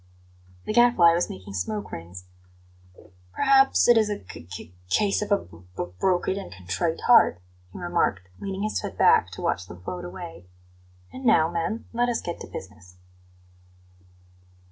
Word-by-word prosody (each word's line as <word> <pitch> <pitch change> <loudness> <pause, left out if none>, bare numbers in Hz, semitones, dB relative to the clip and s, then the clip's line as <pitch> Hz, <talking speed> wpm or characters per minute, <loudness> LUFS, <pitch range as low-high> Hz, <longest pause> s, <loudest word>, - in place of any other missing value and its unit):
The - - -2
Gadfly 240 -8 +6
was 170 +1 0
making 95 +1 -9
smoke 100 +2 -3
rings. 90 +2 -8 1.1
"Perhaps 270 0 +4
it 240 -1 +7
is 215 -1 +1
a 205 - -2
c 85 - -11
c 90 -1 -9 0.2
case 200 - +2
of 210 - -4
a 200 - +5
'b 85 - -14 0.2
b - - -1 0.2
broken 190 +1 +1
and 195 - -9
contrite 95 - -3
heart,'" 235 - +5 0.3
he - - -10
remarked, 170 - -1
leaning 195 0 -4
his 215 - -1
head - - -6
back - - +5
to - - -8
watch 90 - -1
them 90 +1 -12
float 90 -1 -5
away. 90 -1 -9 0.7
"And 260 - -8
now, 165 -9 +4
men, 175 +7 -3
let 240 +1 +1
us 235 - 0
get 170 - -5
to - - -8
business." 95 -2 -10
165 Hz, 165 wpm, -25 LUFS, -, 1.1 s, it